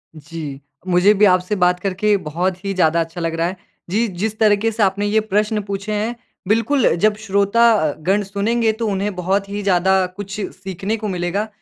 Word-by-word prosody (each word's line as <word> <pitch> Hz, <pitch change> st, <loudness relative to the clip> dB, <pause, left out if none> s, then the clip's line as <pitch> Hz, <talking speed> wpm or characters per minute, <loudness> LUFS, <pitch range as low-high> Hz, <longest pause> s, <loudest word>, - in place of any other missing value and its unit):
जी। 150 Hz, -2 st, -7 dB, 0.3 s
मुझे 180 Hz, +3 st, +4 dB
भी 210 Hz, 0 st, +4 dB
आपसे 185 Hz, +1 st, +2 dB
बात 180 Hz, 0 st, +3 dB
करके 200 Hz, +2 st, +1 dB
बहुत 180 Hz, +4 st, -2 dB
ही 195 Hz, -, -1 dB
ज़्यादा 170 Hz, -2 st, +2 dB
अच्छा 165 Hz, +1 st, -5 dB
लग 165 Hz, 0 st, -1 dB
रहा 165 Hz, +1 st, 0 dB
है। 185 Hz, +1 st, -5 dB, 0.3 s
जी, 225 Hz, +5 st, +1 dB
जिस 210 Hz, +4 st, -3 dB
तरीके 215 Hz, +1 st, +3 dB
से 220 Hz, -1 st, 0 dB
आपने 200 Hz, +1 st, +1 dB
ये 215 Hz, +1 st, +2 dB
प्रश्न 210 Hz, +1 st, +1 dB
पूछे 200 Hz, +1 st, -4 dB
हैं 220 Hz, +3 st, -2 dB, 0.3 s
बिल्कुल 230 Hz, -, +2 dB
जब 215 Hz, -, +3 dB
श्रोता 200 Hz, +4 st, +3 dB
अ, 155 Hz, -9 st, +2 dB
गण 195 Hz, +5 st, +1 dB
सुनेंगे 220 Hz, +4 st, 0 dB
तो 220 Hz, 0 st, -3 dB
उन्हें 200 Hz, +1 st, -1 dB
बहुत 195 Hz, +2 st, -1 dB
ही 205 Hz, +1 st, -4 dB
ज़्यादा 190 Hz, 0 st, +3 dB
अ, -, -, -1 dB
कुछ 205 Hz, 0 st, -6 dB, 0.2 s
सीखने 195 Hz, +4 st, -3 dB
को 215 Hz, 0 st, -4 dB
मिलेगा। 185 Hz, +3 st, -2 dB
200 Hz, 195 wpm, -19 LUFS, 180-210 Hz, 0.3 s, मुझे